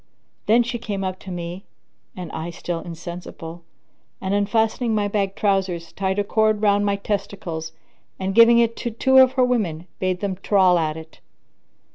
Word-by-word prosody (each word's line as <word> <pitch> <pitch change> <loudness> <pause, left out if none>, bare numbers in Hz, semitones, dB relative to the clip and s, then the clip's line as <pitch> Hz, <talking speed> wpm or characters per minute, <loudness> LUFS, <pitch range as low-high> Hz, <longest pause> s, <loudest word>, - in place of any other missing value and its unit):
[FN#3] - - -44 0.4
Then 235 +3 +5
she 240 +1 -3
came 205 -4 -4
up 185 0 -3
to 190 - -10
me 175 +1 -6 0.5
(and 180 -3 -6
I 160 +2 -5
still 170 0 -4
insensible) 170 0 -8 0.6
and, 190 +1 -2
unfastening 220 +3 +1
my 205 -1 +1
bag 200 -1 -1
trousers, 190 -4 0
tied 190 0 -2
a 205 - +2
cord 215 +1 +2
round 205 0 +3
my 200 - +2
testicles 195 -5 -4 0.5
and, 190 0 -2
giving 230 +2 +7
it 230 -1 +3
to 240 - -3
two 265 +4 +4
of 260 0 +6
her 260 -1 +3
women, 190 -10 -1
bade 185 -1 -1
them 195 -2 -3
trawl 185 -4 +4
at 155 -1 -1
it. 160 0 -12
195 Hz, 175 wpm, -22 LUFS, 175-215 Hz, 0.6 s, giving